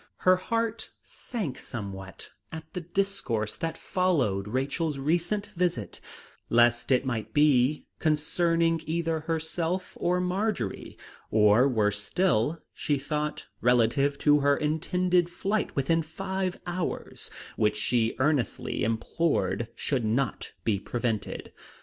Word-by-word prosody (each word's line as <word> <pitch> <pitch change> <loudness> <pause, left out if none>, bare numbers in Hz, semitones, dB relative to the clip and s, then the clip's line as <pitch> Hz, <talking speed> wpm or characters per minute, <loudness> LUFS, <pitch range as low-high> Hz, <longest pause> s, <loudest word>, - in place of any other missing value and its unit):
Her 185 0 +7
heart 230 +3 -2
sank 200 - -5
somewhat 95 -5 -7 0.2
at 160 0 -6
the 180 - -3
discourse 170 - -1
that 165 0 -3
followed 135 - +1
Rachel's 140 +6 -1
recent 175 +8 0
visit, 170 - -1 0.5
lest 120 +2 +3
it 130 +1 +3
might 120 -5 -3
be 145 -1 +4
concerning 165 +2 +2
either 165 0 0
herself 165 +3 -2
or 180 +1 +2
Marjory; 180 - -2 0.3
or, 105 +4 +5
worse 105 -4 +1
still, 165 - +1
she 145 -2 0
thought, 150 +2 -3 0.2
relative 125 +4 +3
to 150 0 +4
her 140 0 +3
intended 175 +3 +1
flight 200 +4 -1
within 165 +4 +2
five 190 +3 -3
hours, 175 -1 -3 0.3
which 105 -1 +1
she 115 +1 +1
earnestly 135 -4 0
implored 120 +2 0
should 135 -5 -1
not 120 +4 -1
be 105 -4 +1
prevented. 115 0 -3
150 Hz, 115 wpm, -28 LUFS, 120-175 Hz, 0.5 s, Her